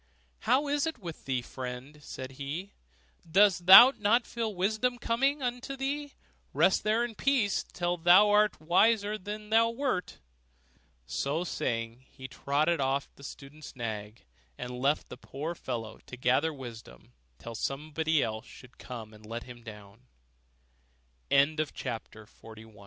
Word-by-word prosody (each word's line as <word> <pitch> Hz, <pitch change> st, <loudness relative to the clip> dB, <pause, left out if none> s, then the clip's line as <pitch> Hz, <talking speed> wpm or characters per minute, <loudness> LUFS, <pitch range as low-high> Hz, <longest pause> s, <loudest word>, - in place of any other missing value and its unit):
'How 285 Hz, -, +2 dB
is 290 Hz, +2 st, 0 dB
it 320 Hz, -, -3 dB
with 170 Hz, -7 st, -9 dB
thee, 130 Hz, -2 st, -1 dB
friend?' 130 Hz, +4 st, -8 dB
said 130 Hz, -2 st, -8 dB
he, 145 Hz, +9 st, -6 dB, 0.6 s
'dost 185 Hz, 0 st, +4 dB
thou 240 Hz, +8 st, +11 dB
not 225 Hz, +4 st, +3 dB
feel 230 Hz, -2 st, -3 dB
that 210 Hz, -, -9 dB
wisdom 220 Hz, +6 st, 0 dB
comes 270 Hz, +5 st, 0 dB
unto 245 Hz, +2 st, -4 dB
thee? 280 Hz, +2 st, -3 dB, 0.4 s
Rest -, -, +3 dB
there 220 Hz, +3 st, +2 dB
in 240 Hz, -, -7 dB
peace, 235 Hz, -4 st, +1 dB
till 175 Hz, 0 st, -1 dB
thou 180 Hz, +5 st, +6 dB
art 210 Hz, 0 st, +3 dB
a -, -, -20 dB
wiser 205 Hz, +5 st, +3 dB
man 215 Hz, -3 st, -5 dB
than 210 Hz, +1 st, -6 dB
thou 230 Hz, +1 st, +5 dB
wert.' 230 Hz, -6 st, -2 dB, 0.9 s
So 140 Hz, -, -2 dB
saying, 115 Hz, -6 st, -3 dB
he 130 Hz, -, -10 dB
trotted 145 Hz, +5 st, 0 dB
off 135 Hz, +1 st, 0 dB
on -, -, -39 dB
the 140 Hz, -, -15 dB
student's 140 Hz, +2 st, -10 dB
nag, 110 Hz, -, -6 dB, 0.3 s
and 125 Hz, -, -6 dB
left 135 Hz, +4 st, 0 dB
the 125 Hz, -, -9 dB
poor 145 Hz, +6 st, -5 dB
fellow 115 Hz, -8 st, -6 dB
to 125 Hz, -, -9 dB
gather 130 Hz, +6 st, +2 dB
wisdom 115 Hz, -, -11 dB, 0.2 s
till 115 Hz, -, -9 dB
somebody 155 Hz, +4 st, -1 dB, 0.3 s
should 125 Hz, -1 st, -16 dB
come 115 Hz, -4 st, -8 dB
and 105 Hz, 0 st, -16 dB
let 115 Hz, +2 st, -6 dB
160 Hz, 140 wpm, -29 LUFS, 130-215 Hz, 0.9 s, thou